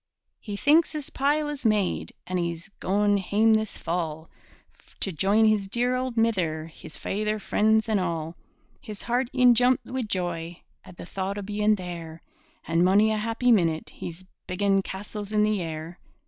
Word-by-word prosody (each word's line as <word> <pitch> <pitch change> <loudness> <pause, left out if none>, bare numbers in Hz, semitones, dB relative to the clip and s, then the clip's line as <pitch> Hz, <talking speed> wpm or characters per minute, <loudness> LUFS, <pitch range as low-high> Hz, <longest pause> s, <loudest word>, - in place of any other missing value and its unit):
He 205 -2 -6
thinks 315 +8 +4
his 300 -3 -4
pile 295 +2 +1
is 295 -2 -5
made, 210 -5 +1
An' 185 - -2
he's 170 +2 -3
goin' 205 +1 +2
hame 210 +4 +3
this 220 -1 0
fall, 165 -2 -3 0.7
To 195 - +1
join 200 +7 +3
his 215 -2 +2
dear 245 +4 +1
auld 255 -2 -3
mither, 180 -9 +1
His 160 -1 -10
faither, 215 +2 -1
freends, 220 +2 +2
and 215 -2 +2
all. 165 -2 -3 0.5
His 210 -2 -8
heart 245 +1 0
e'en 250 -1 +6
jumps 250 +2 +2
wi' 260 0 -1
joy 175 -5 -3 0.2
At 175 - -14
the - - -8
thocht 195 +2 -4
o' 205 - -4
bein' 210 +1 +1
there, 170 -3 -7 0.4
An' 165 +1 +2
mony 205 +4 +4
a 215 - 0
happy 230 +3 +1
minute 165 -7 +2
He's 175 +2 -8 0.2
biggin' 195 +1 +2
castles 205 +2 -6
in 210 -1 +3
the 210 -2 +1
air! 165 +1 -6
205 Hz, 170 wpm, -26 LUFS, 175-220 Hz, 0.7 s, e'en